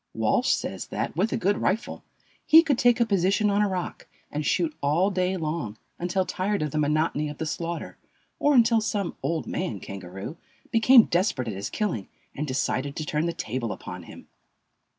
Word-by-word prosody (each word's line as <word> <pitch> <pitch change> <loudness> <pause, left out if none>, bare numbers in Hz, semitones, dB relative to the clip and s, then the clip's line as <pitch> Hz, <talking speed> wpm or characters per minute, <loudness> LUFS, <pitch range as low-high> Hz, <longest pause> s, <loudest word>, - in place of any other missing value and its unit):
Walsh - - +2
says - - -2
that, - - -3
with 195 +7 +1
a - - 0
good 200 +3 +1
rifle, 215 +5 -1 0.4
he 325 +1 +9
could 285 -6 +1
take 245 0 +4
a 235 - +4
position 200 +1 +2
on 200 +1 +2
a 205 - +2
rock 185 -2 -4 0.2
and 150 - -2
shoot 160 +1 0
all 165 +8 +2
day 185 0 0
long, 155 - -3 0.2
until 180 +2 0
tired 195 -1 -1
of 150 - -2
the 155 - -1
monotony 150 0 +1
of 145 - -8
the 160 - -3
slaughter, 170 +2 -4 0.4
or 290 0 +3
until 230 -2 +5
some 205 -3 -2
"old 165 -1 -1
man" 150 - -3
kangaroo 95 - -8 0.3
became 230 +2 +7
desperate 170 - 0
at 110 - -2
his 100 +2 -4
killing 175 - -2 0.3
and 150 +2 -4
decided 140 +1 -1
to 155 - -4
turn 150 +2 0
the - - 0
table 120 -6 -3
upon 90 -2 -7
him. 85 - -13
170 Hz, 190 wpm, -26 LUFS, 145-205 Hz, 0.4 s, he